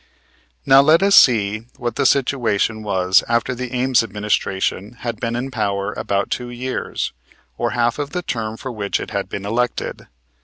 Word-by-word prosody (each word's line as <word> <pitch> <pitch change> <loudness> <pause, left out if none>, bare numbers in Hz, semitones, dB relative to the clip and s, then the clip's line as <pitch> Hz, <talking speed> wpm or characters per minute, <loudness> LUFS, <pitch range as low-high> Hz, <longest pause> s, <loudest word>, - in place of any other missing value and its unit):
Now 135 +1 +7
let 155 +6 +5
us 200 0 +5
see 110 -2 +4
what 120 -2 -3
the 140 -2 +3
situation 120 -6 +1
was 95 -2 +2
after 120 +1 +1
the 125 0 -5
Ames 130 -1 +2
administration 105 -1 -2
had 115 -3 -4
been 115 -1 -2
in 130 +3 -3
power 100 -3 -1
about 100 -3 -2
two 125 -1 -3
years, 125 +1 -4 0.4
or 120 - -1
half 120 +2 +1
of 145 -1 -2
the 180 +3 -4
term 115 -6 -3
for 130 - -6
which 105 -4 -2
it - - -7
had 100 -2 -3
been 100 - -5
elected. 120 +4 -2
120 Hz, 170 wpm, -20 LUFS, 105-125 Hz, 0.4 s, Now